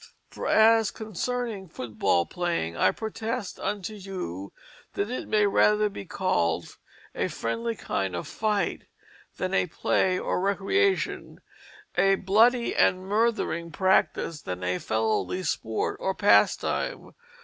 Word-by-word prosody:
For - - -5
as 225 0 +5
concerning 220 -1 -4
football 100 - 0
playing 170 - -2
I - - +4
protest 220 -1 -4
unto 205 +1 -3
you 185 - -6 0.4
that 205 +3 -1
it 255 - -4
may 210 -1 +3
rather 210 +1 +3
be 195 - -8
called 85 - -1 0.4
a - - -1
friendlie 230 - -3
kinde 95 - -2
of 85 - -4
fyghte 210 -2 -1 0.5
than 185 +1 -2
a 195 - +2
play 185 +2 +1
or - - -1
recreation 200 - 0 0.6
a 195 0 +4
bloody 225 +6 +3
and 185 0 +3
murthering 205 -5 0
practice 165 -3 +1
than 90 0 -5
a 90 0 -1
felowly 110 +11 -1
sport 110 -6 -2
or 190 0 -1
pastime. 100 0 +2
195 Hz, 125 wpm, -26 LUFS, -, 0.6 s, as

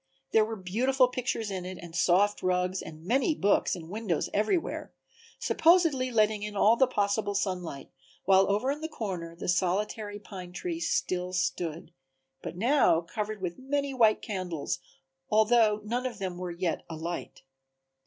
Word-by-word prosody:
There 220 - +5
were 225 +1 -3
beautiful 250 +7 +2
pictures 235 -4 -2
in 185 -2 -3
it 185 0 -6
and 170 -1 -10
soft 185 +4 +3
rugs 180 0 0
and 155 0 -10
many 270 - +2
books 200 -4 +2
and 165 -3 -9
windows 200 -3 -2
everywhere, 215 - -1 0.4
supposedly 325 -6 +3
letting 215 -3 +2
in 210 0 -5
all 215 +3 +5
the 260 +2 +4
possible 205 -3 0
sunlight, 180 -8 -3 0.3
while 195 0 +5
over 215 +7 +1
in 295 +2 -4
the 320 - -2
corner 180 - -5
the 170 - -6
solitary 205 +4 0
pine 185 -4 -9
tree 330 - -4
still 180 - -1
stood, 170 -3 -2 0.5
but - - -7
now 235 - +4
covered 205 +3 -5
with 175 -1 -3
many 280 +1 -1
white 225 -4 +4
candles, 185 -7 -3 0.5
although 215 0 +4
none 245 +4 -1
of 235 -4 -7
them 185 -3 -4
were 180 -1 -4
yet 175 0 -2
a 165 - -5
light. 165 -3 -6
205 Hz, 160 wpm, -29 LUFS, 180-235 Hz, 0.5 s, There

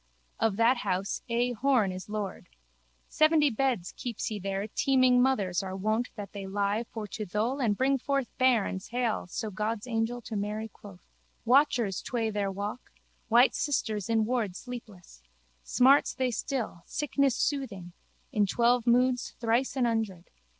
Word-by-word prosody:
Of 225 -3 +2
that 235 +3 +4
house 195 -3 -2
A. 240 +1 +1
Horne 240 -4 +2
is 185 +2 -8
lord. 210 -2 -4 0.6
Seventy 310 -2 +4
beds 235 -7 0
keeps 240 -3 -4
he 215 -2 -3
there 195 +1 -3
teeming 255 +1 +3
mothers 205 -9 +1
are 190 -1 -5
wont 215 +5 0
that 205 -3 -7
they 200 -1 -6
lie 205 +3 -1
for 220 -2 -5
to 220 - -5
thole 215 +8 -1
and 215 -6 +1
bring 270 +1 +2
forth 275 -1 -2
bairns 230 -7 +2
hale 235 -4 -1
so 215 +4 -4
God's 210 +3 -2
angel 230 0 -1
to 220 - -6
Mary 210 +2 -3
quoth. 195 -4 -14 0.4
Watchers 240 -6 +3
tway 230 -3 -2
there 200 -2 -1
walk, 205 +5 -6 0.4
white 240 +3 +5
sisters 220 -8 -1
in 225 -1 +2
ward 225 -6 -1
sleepless. 210 - -10 0.4
Smarts 265 - +4
they 255 -1 0
still, 235 - -3
sickness 280 -3 0
soothing: 215 - -2 0.4
in 205 -1 +2
twelve 240 +3 +2
moons 250 +1 +2
thrice 235 +4 +1
an 255 -2 +2
hundred. 220 -7 -2
225 Hz, 155 wpm, -29 LUFS, 205-250 Hz, 0.6 s, white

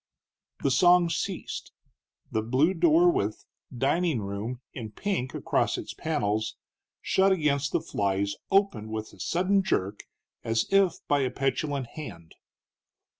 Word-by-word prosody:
The 140 - +2
song 175 +4 +5
ceased, - - -4 0.6
the 110 - 0
blue 130 - +2
door 170 0 +5
with 105 -7 -2 0.3
DINING 140 +3 +1
ROOM 100 +5 -4
in 115 -4 -6
pink 130 - -3
across - - 0
its - - -6
panels, 105 +2 -1 0.5
shut 190 +1 +3
against 145 -6 +1
the - - +1
flies, 100 0 -1 0.2
opened 195 - +2
with 110 0 -6
sudden 185 +3 +2
jerk, 105 - -1 0.4
as 115 0 +1
if 195 -3 +4
by 145 - +3
a 130 -2 +1
petulant 135 +1 -1
hand. 100 - -9
135 Hz, 125 wpm, -27 LUFS, 110-175 Hz, 0.6 s, song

